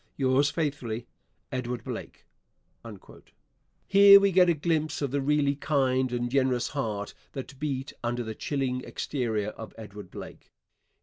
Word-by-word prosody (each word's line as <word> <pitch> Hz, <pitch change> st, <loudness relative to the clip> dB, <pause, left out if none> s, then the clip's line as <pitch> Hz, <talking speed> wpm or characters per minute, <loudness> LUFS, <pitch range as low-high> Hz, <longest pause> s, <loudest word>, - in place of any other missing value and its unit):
Yours 135 Hz, +1 st, +3 dB
faithfully, 140 Hz, -7 st, -3 dB, 0.5 s
EDWARD 125 Hz, -1 st, -3 dB
BLAKE. -, -, -7 dB, 1.6 s
Here 200 Hz, 0 st, +9 dB
we 200 Hz, 0 st, +3 dB
get 180 Hz, -1 st, +5 dB
a 170 Hz, -, +3 dB
glimpse 155 Hz, 0 st, -1 dB
of 140 Hz, -3 st, -2 dB
the 140 Hz, 0 st, 0 dB
really 140 Hz, 0 st, +2 dB
kind 130 Hz, -3 st, +1 dB
and 120 Hz, 0 st, -2 dB
generous 130 Hz, -2 st, +1 dB
heart 110 Hz, -8 st, -3 dB, 0.2 s
that 135 Hz, -1 st, -7 dB
beat 140 Hz, -2 st, -3 dB
under 120 Hz, +1 st, -1 dB
the 110 Hz, -1 st, -5 dB
chilling 130 Hz, +1 st, -2 dB
exterior 110 Hz, -7 st, -2 dB
of 110 Hz, 0 st, -10 dB
Edward 105 Hz, -3 st, -10 dB
Blake. -, -, -10 dB
135 Hz, 135 wpm, -28 LUFS, 120-145 Hz, 1.6 s, Here